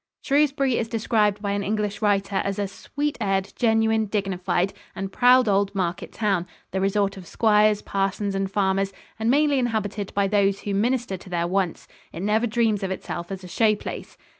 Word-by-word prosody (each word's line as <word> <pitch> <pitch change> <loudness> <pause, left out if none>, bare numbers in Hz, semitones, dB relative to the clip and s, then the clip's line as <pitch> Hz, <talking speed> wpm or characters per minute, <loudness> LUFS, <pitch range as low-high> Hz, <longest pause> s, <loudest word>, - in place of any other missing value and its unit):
Shrewsbury 275 -3 +2
is 230 - -1
described 215 -2 +1
by 200 - -1
an 200 0 -1
English 210 0 -2
writer 200 -2 +1
as 195 0 -1
a 200 -1 -1
"sweet 290 +9 -4
aired, 195 -2 0
genuine, 220 -2 +2
dignified 195 -2 -1 0.2
and 195 0 -4
proud 250 +2 +5
old 200 0 +1
market 180 -2 -2
town, 195 -5 0 0.2
the 190 - -1
resort 195 0 +1
of 180 -2 -10
squires, 210 -1 +3
parsons 195 +1 -1
and 195 0 -1
farmers, 195 0 0 0.3
and 220 +1 +1
mainly 285 +1 +3
inhabited 210 -4 -2
by 200 -1 +2
those 200 -1 +2
who 205 - -3
minister 235 0 0
to 185 - -14
their 170 -1 0
wants. 185 -1 -1 0.2
It 165 - -7
never 215 +3 +2
dreams 220 -2 +1
of 195 - -2
itself 175 -1 -5
as 190 -1 -6
a - - -8
show 215 +4 +2
place." - - -8
205 Hz, 185 wpm, -24 LUFS, 195-220 Hz, 0.3 s, proud